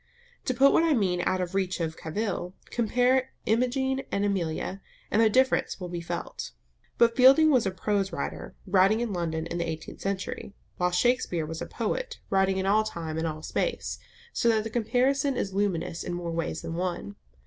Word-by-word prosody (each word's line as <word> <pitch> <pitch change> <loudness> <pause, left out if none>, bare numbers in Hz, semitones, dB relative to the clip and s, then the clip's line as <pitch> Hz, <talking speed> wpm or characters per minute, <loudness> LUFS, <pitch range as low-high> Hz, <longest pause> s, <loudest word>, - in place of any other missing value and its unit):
To 255 - 0
put 275 +3 +6
what - - +5
I 330 -2 +3
mean 185 -6 +1
out 185 - +1
of 180 0 -3
reach 190 -2 0
of 160 -1 -2
cavil, 180 +2 -3 0.2
compare 250 +3 +2 0.2
Imogen 265 +4 +1
and 200 +1 +1
Amelia, 190 0 -2 0.3
and 220 - +4
the 225 - +5
difference 260 0 +2
will 180 -2 -5
be 175 -1 -4
felt. 170 - -5 0.4
But 230 0 +4
Fielding 275 +5 +7
was 250 -7 +3
a - - +2
prose 195 +1 -1
writer, 170 - -5
writing 195 +3 +4
in 235 -3 -2
London 165 -2 -2
in 170 +1 -4
the 170 -1 -1
eighteenth 160 0 -7
century, 195 +1 -4 0.2
while 180 0 +2
Shakespeare 180 -3 +1
was 160 +1 -6
a - - -4
poet - - -3
writing 190 0 +3
in 190 - -1
all 210 +2 +4
time 165 -6 -4
and 165 - 0
all 155 0 -5
space, - - -2 0.3
so 235 - +2
that 220 -2 +3
the 225 - -5
comparison 260 +4 +1
is 195 - -2
luminous 190 -4 -1
in 175 - -3
more 175 -1 -4
ways 165 -1 -3
than 165 - -4
one. 175 - -3
195 Hz, 190 wpm, -27 LUFS, 175-240 Hz, 0.4 s, Fielding